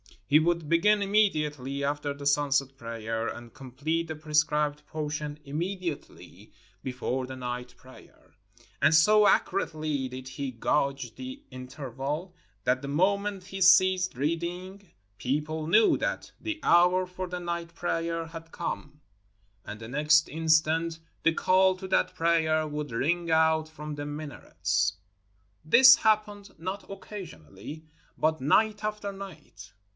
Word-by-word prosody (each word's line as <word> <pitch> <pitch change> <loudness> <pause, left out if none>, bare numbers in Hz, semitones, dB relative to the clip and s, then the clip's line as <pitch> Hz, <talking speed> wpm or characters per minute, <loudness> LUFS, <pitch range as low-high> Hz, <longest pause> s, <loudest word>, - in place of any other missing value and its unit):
He 145 +9 +5
would 170 -1 0
begin 205 +6 +3
immediately 150 -10 +1
after 145 0 -1
the 140 0 -9
sunset 140 -2 +1
prayer, 115 -1 -4
and 120 -1 -7
complete 145 +5 -3
the 160 - -5
prescribed 150 -1 0
portion 150 -1 -4
immediately 170 +2 -6 0.3
before 130 0 -3
the 130 - -7
night 125 -1 -5
prayer. 130 0 -18 0.5
And 160 - +5
so 210 +6 +6
accurately 155 -7 0
did 130 0 -8
he 135 0 -4
gauge 135 -1 -1
the 130 +1 -8
interval 135 +6 -5 0.3
that 125 +2 +1
the 140 - -6
moment 195 +6 0
he 195 +1 -8
ceased 185 -1 +5
reading 175 +7 -4 0.3
people 155 +4 -2
knew 215 +6 +5
that - - -3
the 320 -1 -4
hour 180 +2 +4
for 185 0 -6
the 180 0 -5
night 170 -1 -4
prayer 165 -1 -2
had 165 0 -10
come; 150 -3 -5 0.6
and 105 0 -7
the 110 - -8
next 150 +3 +3
instant, 160 +1 +2 0.3
the 165 - +4
call 185 +2 +3
to 190 +1 -8
that - - +1
prayer 160 -1 +2
would 150 -2 -5
ring 165 +9 0
out 160 -1 +3
from 150 -1 -7
the 145 0 -5
minarets. 145 -10 -2 0.7
This 255 - +8
happened 210 -3 0
not 185 +5 -6
occasionally, 155 - -9 0.3
but 155 -2 +1
night 210 +9 +2
after 210 -1 -3
night. 195 -11 -11
155 Hz, 130 wpm, -28 LUFS, 140-180 Hz, 0.7 s, This